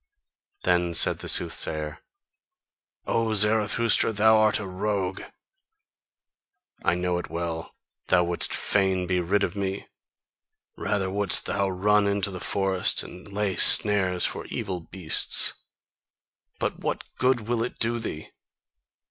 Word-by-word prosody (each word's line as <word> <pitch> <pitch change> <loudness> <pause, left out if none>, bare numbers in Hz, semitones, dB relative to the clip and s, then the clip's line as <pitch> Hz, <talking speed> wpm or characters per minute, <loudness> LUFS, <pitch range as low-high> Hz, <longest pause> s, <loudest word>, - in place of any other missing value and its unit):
Then 85 -1 0
said - - +2
the - - -6
soothsayer: 75 -1 -2 1.1
"O 115 -1 -1
Zarathustra, 110 +2 +1
thou 110 +1 +3
art 110 -1 +3
a 105 - -6
rogue! 95 0 -3 1.6
I 85 - +1
know 90 0 -2
it 90 - -8
well: 85 -1 -5 0.3
thou 90 -1 +3
wouldst 85 0 -1
fain 95 -2 0
be 90 0 -1
rid 95 +4 0
of - - -3
me! 100 0 -4 0.9
Rather 100 -2 -2
wouldst 100 -2 +3
thou 100 -1 -1
run 100 +2 +1
into 100 -1 -1
the 90 - -7
forest 95 -1 0
and 95 +3 -13
lay 100 -2 -2
snares 95 -4 +5
for - - -4
evil 95 -5 -5
beasts! 85 0 +5 1.0
But - - -4
what - - -4 0.2
good 130 -1 +1
will 115 +1 -3
it 120 - -6
do 115 +1 -1
thee? 80 -9 -7
95 Hz, 130 wpm, -24 LUFS, 90-105 Hz, 1.6 s, snares